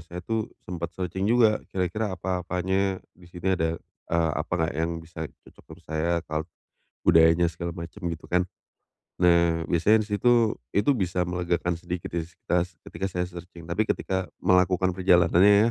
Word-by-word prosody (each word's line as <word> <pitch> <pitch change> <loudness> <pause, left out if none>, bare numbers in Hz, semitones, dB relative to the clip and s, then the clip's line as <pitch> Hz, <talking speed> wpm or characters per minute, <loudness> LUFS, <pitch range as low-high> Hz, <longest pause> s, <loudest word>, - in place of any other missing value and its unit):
saya 85 +2 -9
tuh 110 +1 -2 0.2
sempet 85 -2 -4
searching 95 +1 -2
juga 115 -3 +4
kira-kira 95 +2 -1
apa-apanya 95 +2 -1 0.2
di 90 - -18
sini 90 +2 -1
ada, 80 -2 -1 0.3
eee, 85 -1 +2
apa 80 +3 -4
enggak 80 0 0
yang 80 +2 0
bisa 80 0 -13 0.3
cocok - - -18
dengan 85 - -22
saya 80 +2 -1
kalo 80 0 -2 0.6
budayanya 80 +1 +6
segala 85 +1 -5
macem 85 +4 -8
gitu 80 -1 -6
kan, 90 0 0 0.7
nah 85 -2 +3
biasanya 105 +6 +4
di 105 - -9
situ 120 -3 +3 0.2
itu 105 +8 +3
bisa 90 -2 0
melegakan 90 -1 -1
sedikit 85 0 -5
kistas 85 +1 -2
ketika 95 +3 -5
saya 90 -2 -2
searching 85 -1 -10
tapi 105 +5 +1
ketika 95 -3 -1 0.2
melakukan 90 0 +3
perjalanannya 95 +4 +5
90 Hz, 155 wpm, -26 LUFS, 85-95 Hz, 0.7 s, budayanya